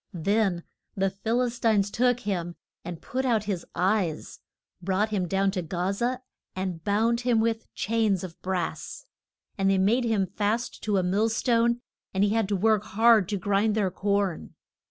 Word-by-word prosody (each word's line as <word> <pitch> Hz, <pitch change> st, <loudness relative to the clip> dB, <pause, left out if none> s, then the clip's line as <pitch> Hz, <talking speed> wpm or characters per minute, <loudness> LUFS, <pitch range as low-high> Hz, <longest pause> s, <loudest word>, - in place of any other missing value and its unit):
Then 190 Hz, 0 st, +1 dB, 0.3 s
the 195 Hz, 0 st, +1 dB
Phil 225 Hz, +6 st, 0 dB
is 240 Hz, -1 st, -3 dB
tines 210 Hz, -4 st, +2 dB
took 245 Hz, +1 st, +2 dB
him 175 Hz, -4 st, -3 dB, 0.3 s
and 170 Hz, -1 st, -7 dB
put 260 Hz, +2 st, -2 dB
out 230 Hz, -5 st, +1 dB
his 195 Hz, -5 st, -4 dB
eyes, 180 Hz, -3 st, 0 dB, 0.4 s
brought 195 Hz, +4 st, 0 dB
him 195 Hz, -4 st, -1 dB
down 195 Hz, +2 st, +1 dB
to 190 Hz, -2 st, -2 dB
Ga 180 Hz, +3 st, -2 dB
za, 245 Hz, +5 st, -1 dB, 0.3 s
and 185 Hz, -3 st, -4 dB
bound 225 Hz, +4 st, +1 dB
him 240 Hz, -2 st, +2 dB
with 225 Hz, 0 st, -1 dB
chains 215 Hz, -3 st, +1 dB
of 175 Hz, -3 st, -9 dB
brass. 190 Hz, -, -4 dB, 0.5 s
And 195 Hz, 0 st, +3 dB
they 195 Hz, -, +3 dB
made 225 Hz, +6 st, +2 dB
him 215 Hz, -4 st, +1 dB
fast 215 Hz, +5 st, -2 dB
to 210 Hz, -2 st, +1 dB
a 185 Hz, -, +2 dB
mill 200 Hz, +5 st, +1 dB
stone, 235 Hz, +1 st, +1 dB, 0.3 s
and 190 Hz, -, +3 dB
he 205 Hz, -, +2 dB
had 220 Hz, -2 st, +1 dB
to 205 Hz, -, +1 dB
work 215 Hz, +2 st, +2 dB
hard 220 Hz, -1 st, +4 dB
to 205 Hz, -, -1 dB
grind 205 Hz, +3 st, +1 dB
their 200 Hz, -4 st, +1 dB
corn. 200 Hz, -, -1 dB
205 Hz, 175 wpm, -26 LUFS, 190-225 Hz, 0.5 s, hard